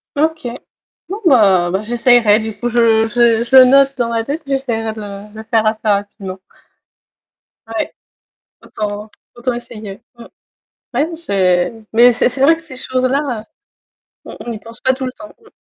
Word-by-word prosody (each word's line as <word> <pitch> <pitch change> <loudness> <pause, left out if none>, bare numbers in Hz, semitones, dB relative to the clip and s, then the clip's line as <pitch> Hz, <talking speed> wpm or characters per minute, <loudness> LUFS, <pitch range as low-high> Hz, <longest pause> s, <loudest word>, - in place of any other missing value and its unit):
OK. 315 -1 0 0.6
Non, 410 +4 -5
bah 195 - +4
bah, 190 +2 -1
j'essayerai, 235 -1 +3
du 220 -1 -6
coup, 240 - -1
je 225 -2 +3
je 235 0 +3
je 255 +3 0
le 260 -1 +10
note 275 +1 +4
dans 240 -2 0
ma 230 -1 -1
tête, 290 +7 -4
j'essaierai 240 -5 -2
de 215 - -9
le 205 0 -9
le 220 - -8
faire 220 0 +1
assez 215 0 -1
rapidement. 200 -2 -2 1.3
Ouais, 225 0 -4 0.7
autant 210 0 -5 0.2
autant 245 +1 -2
essayer, 220 -4 -9 0.2
mmh. 235 - -12 0.7
Ouais, 245 - +1
n 325 +3 -2
c'est 185 - +1 0.2
mais 240 +2 +7
c'est 245 - +2
c'est 260 +2 -7
vrai 320 +4 +5
que 330 - -16
ces 265 -6 -12
choses-là, 255 -1 -1
heu, - - -16 0.8
on - - -10
on - - -5
n'y 225 - -5
pense 230 +2 -10
pas 260 - +2
tout 260 0 -5
le 255 - -3
temps, 315 - -12
mmh. 445 - -21
235 Hz, 180 wpm, -16 LUFS, 215-260 Hz, 1.3 s, le